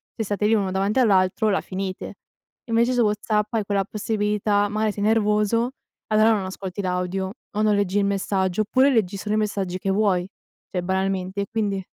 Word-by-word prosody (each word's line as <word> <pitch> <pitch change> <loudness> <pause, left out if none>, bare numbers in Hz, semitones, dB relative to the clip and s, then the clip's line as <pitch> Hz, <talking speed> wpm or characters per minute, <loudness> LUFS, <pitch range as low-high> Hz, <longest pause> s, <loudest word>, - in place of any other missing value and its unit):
se 225 - -2
state 205 0 -1
lì 220 - +3
uno 195 -3 0
davanti 195 +6 +1
all'altro 200 -1 +3
la 195 - +1
finite. 190 0 -5 0.5
Invece 235 +2 +2
su 245 - +2
WhatsApp 210 0 0
hai 220 -3 0
quella 200 -1 +1
possibilità, 210 -1 0
mari 215 +1 0
sei 205 0 -4
nervoso, 215 +2 +2 0.4
allora 215 +1 +4
non 200 -3 -1
ascolti 190 +1 -5
l'audio 185 +1 -2 0.2
o 210 - -2
non 215 -1 +3
leggi 200 -1 0
il 200 - +2
messaggio 195 -1 0
oppure 260 +6 +3
leggi 205 -6 +1
solo 210 +2 -2
i - - +1
messaggi 195 -4 -2
che 195 - -2
vuoi, 190 -3 +1 0.4
cioè, 180 - -1
banalmente, 190 +1 -1
e - - -1
quindi 200 -4 -1
205 Hz, 185 wpm, -23 LUFS, 190-215 Hz, 0.5 s, allora